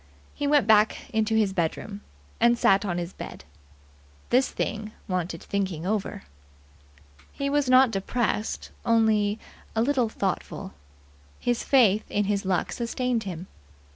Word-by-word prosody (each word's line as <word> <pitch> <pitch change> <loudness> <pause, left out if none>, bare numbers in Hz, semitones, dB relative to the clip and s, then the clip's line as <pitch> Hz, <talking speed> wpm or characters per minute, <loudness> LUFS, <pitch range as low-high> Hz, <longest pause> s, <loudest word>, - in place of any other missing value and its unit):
He 290 - -2
went 290 -1 +4
back 220 +3 +3
into 220 0 +1
his 210 -3 +2
bedroom, 195 +4 -2 0.4
and 235 +1 +4
sat 200 -2 +3
on 175 -3 -1
the 175 - -1
bed. - - -8 0.9
This 255 +2 +4
thing 215 0 -4
wanted 180 -3 -3
thinking 190 -5 -2
over. 205 - -2 1.1
He 280 0 -3
was 290 -2 +1
not 255 -1 +6
depressed 215 +2 -2
only 220 -2 +3 0.4
a 220 - +3
little 255 -3 +1
thoughtful. 195 -4 -3 0.7
His 240 -1 0
faith 220 -6 +4
in 205 - +1
his 200 -1 -1
luck 185 -2 0
sustained 240 -1 -2
him. 180 -2 -5
215 Hz, 135 wpm, -26 LUFS, 195-240 Hz, 1.1 s, not